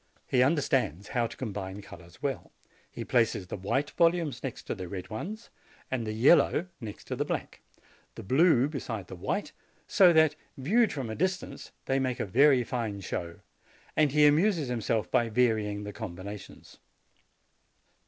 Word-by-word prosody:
He 125 - +2
understands 130 - +1
how 120 -2 0
to - - -12
com 115 -6 -4
bine 95 0 -6
colors 85 +5 -14
well: 140 -2 -3 0.4
he - - -7
places - - +1
the - - -6
white 120 +9 -1
volumes 165 -6 +1
next 135 -4 -5
to - - -3
the 95 -4 -6
red 95 +3 -7
ones, 210 - -6 0.4
the 115 -4 -2
yellow 135 +8 +4
next 110 -5 -9
the - - -1
black, - - -4 0.5
the - - -8
blue 135 - +4
be 145 -2 -4
side 110 -7 -5
the 95 - -9
white, 90 - -3 0.3
so 185 -3 +6
that, 160 -2 +4 0.2
viewed 210 - +2
from 130 -6 -4
a - - -4
distance, 185 +5 -3
they 135 0 +1
make 130 -2 -1
a - - -1
very 130 +5 +4
fine 110 -4 -3
show; 85 -2 -5 0.5
and 150 -3 +3
he 150 +1 +5
amuses 155 -1 +3
himself 115 -2 -1
by 120 -1 +2
vary 110 -2 +2
ing 105 0 -5
the 105 0 -6
combinations. 100 -1 -9
125 Hz, 165 wpm, -29 LUFS, 105-150 Hz, 0.5 s, so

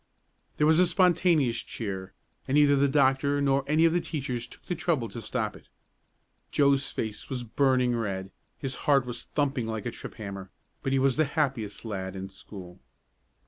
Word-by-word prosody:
There 150 - +3
was 160 +2 +5
a 180 - +5
spontaneous 170 -8 +3
cheer, 95 -4 -5 0.3
and 135 - 0
neither 145 -1 +6
the 140 +1 +3
doctor 140 0 +3
nor 140 -1 +2
any 155 +3 +4
of 165 - +4
the 175 - +2
teachers 125 -8 -4
took - - -16
the - - -2
trouble 160 -8 0
to 115 +4 -7
stop - - -2
it. - - -16 0.8
Joe's 140 -1 +3
face 105 -2 -4
was 125 -2 -3
burning 125 +1 +2
red, 95 -4 -3 0.3
his 135 -2 -3 0.2
heart 140 -3 +5
was 120 -1 -5
thumping 140 -5 -1
like 110 -2 -4
a 120 - -2
trip - - -9
hammer, 100 -3 -7 0.3
but 135 - -2
he 135 - +3
was 135 0 +2
the 155 - +4
happiest 135 -9 -2
lad 95 -3 -4
in 95 0 -6
school. 95 -2 -11
135 Hz, 185 wpm, -28 LUFS, 110-145 Hz, 0.8 s, neither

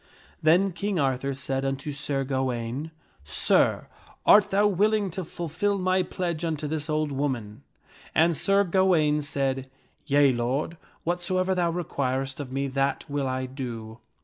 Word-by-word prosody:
Then 180 +5 +4
King 195 +3 -2
Arthur 135 -1 0
said 135 0 -3
unto 135 +2 -2
Sir 140 -1 -2
Gawaine, 130 +1 -2 0.2
" 70 - -31
Sir, 75 - +2 0.4
art 205 -1 +7
thou 205 +1 +3
willing 205 0 +2
to 190 +2 -4
fulfil 175 +5 -2
my 185 0 +2
pledge 175 -3 -3
unto 155 -2 -2
this 155 0 -3
old 155 -1 0
woman?" 130 -5 -3 0.5
And 165 +1 +4
Sir 195 +5 +3
Gawaine 170 -5 +3
said, 135 -2 -2 0.4
"Yea, 140 -1 +5
lord, 130 +8 -1 0.3
whatsoever 185 +2 0
thou 175 -2 +1
requirest 135 -6 -2
of 135 -3 -6
me, 140 +1 -1
that 135 +2 -1
will 140 -1 -1
I 130 0 -2
do." 120 -4 -7
145 Hz, 150 wpm, -26 LUFS, 135-175 Hz, 0.5 s, art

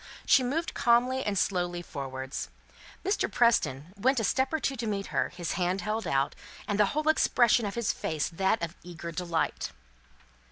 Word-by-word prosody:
She 270 - +6
moved 290 +7 -1
calmly 250 +2 +3
and 205 -1 -1
slowly 175 -2 0
forwards; 135 -3 -5 0.6
Mr. 395 +2 +1
Preston 180 - +2
went 260 +6 +2
a - - -1
step 265 +5 +1
or 315 - 0
two 275 - -1
to 230 -1 -3
meet 200 -2 -2
her, - - +1
his 175 -2 -4
hand 180 +2 0
held 215 +1 -2
out, 135 +1 +1 0.3
and 205 0 -1
the 210 - +5
whole 305 0 0
expression 240 -7 +4
of 200 - -5
his 235 -2 0
face 155 -2 -2
that 190 +4 0
of 170 +1 -4
eager 170 -1 -7
delight. 165 0 -1
200 Hz, 175 wpm, -29 LUFS, 170-240 Hz, 0.6 s, She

